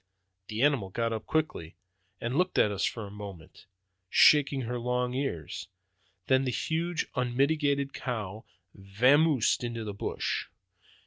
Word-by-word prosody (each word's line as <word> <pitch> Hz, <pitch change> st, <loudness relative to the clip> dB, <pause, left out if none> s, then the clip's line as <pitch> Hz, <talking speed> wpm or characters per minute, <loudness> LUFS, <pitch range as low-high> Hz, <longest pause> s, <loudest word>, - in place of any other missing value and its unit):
The 110 Hz, +3 st, -2 dB
animal 135 Hz, -10 st, +2 dB
got 115 Hz, +3 st, -1 dB
up 110 Hz, -, -5 dB
quickly, 155 Hz, -, -2 dB, 0.4 s
and 120 Hz, +3 st, -3 dB
looked 180 Hz, +3 st, +1 dB
at 105 Hz, -, +4 dB
us 100 Hz, -1 st, 0 dB
for 115 Hz, -3 st, -3 dB
a 100 Hz, -, -10 dB
moment, 100 Hz, -5 st, -10 dB, 0.4 s
shaking 140 Hz, +2 st, +5 dB
her 125 Hz, 0 st, -3 dB
long 125 Hz, +1 st, -1 dB
ears; 125 Hz, -, -4 dB, 0.6 s
then 130 Hz, 0 st, +3 dB
the 130 Hz, -, -1 dB
huge 165 Hz, +6 st, -1 dB
unmitigated 140 Hz, +2 st, +1 dB
cow 110 Hz, -4 st, -4 dB, 0.3 s
vamoosed 125 Hz, +8 st, +3 dB
into 120 Hz, -1 st, -3 dB
the 105 Hz, -2 st, -5 dB
brush. 100 Hz, -, -3 dB
125 Hz, 135 wpm, -29 LUFS, 105-140 Hz, 0.6 s, shaking